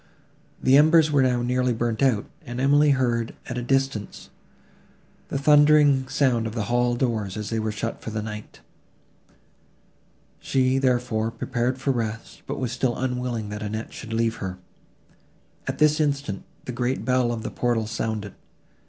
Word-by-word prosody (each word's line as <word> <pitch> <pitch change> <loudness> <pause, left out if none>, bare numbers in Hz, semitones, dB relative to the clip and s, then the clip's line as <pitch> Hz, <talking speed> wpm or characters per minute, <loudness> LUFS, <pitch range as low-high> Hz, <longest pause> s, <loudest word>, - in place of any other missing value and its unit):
The 130 +1 +5
embers 155 +1 +5
were 145 -2 +4
now 125 -2 +2
nearly 125 0 +1
burnt 115 0 -2
out; 125 -7 +2 0.2
and 120 +1 -6
Emily 145 +3 +4
heard, 120 -4 +1
at 120 0 -4
a - - -3
distance, 135 -4 -2 1.0
the - - -3
thundering 145 -1 +5
sound 130 -5 +1
of 110 - -7
the 110 - -1
hall 120 0 +2
doors, 110 -6 -1
as 105 0 -5
they 115 - 0
were 110 0 -1
shut 110 +2 -4
for - - -6
the 110 -1 -3
night. 105 -1 -8 1.8
She, 130 0 +1
therefore, 120 -4 +1
prepared 125 +2 -2
for 135 +1 0
rest, 115 -3 -4
but - - -3
was 125 -3 -2
still 125 0 -1
unwilling 125 -4 -2
that 105 0 -6
Annette 110 +1 -5
should 115 - -8
leave 115 0 0
her. 95 -2 -5 1.1
At - - -2
this 150 0 +3
instant, 140 -9 -1 0.2
the - - -4
great 125 +1 -2
bell 125 -2 +2
of 115 -2 -4
the - - -4
portal 120 -2 0
sounded. 110 -2 -3
120 Hz, 160 wpm, -24 LUFS, 115-135 Hz, 1.8 s, The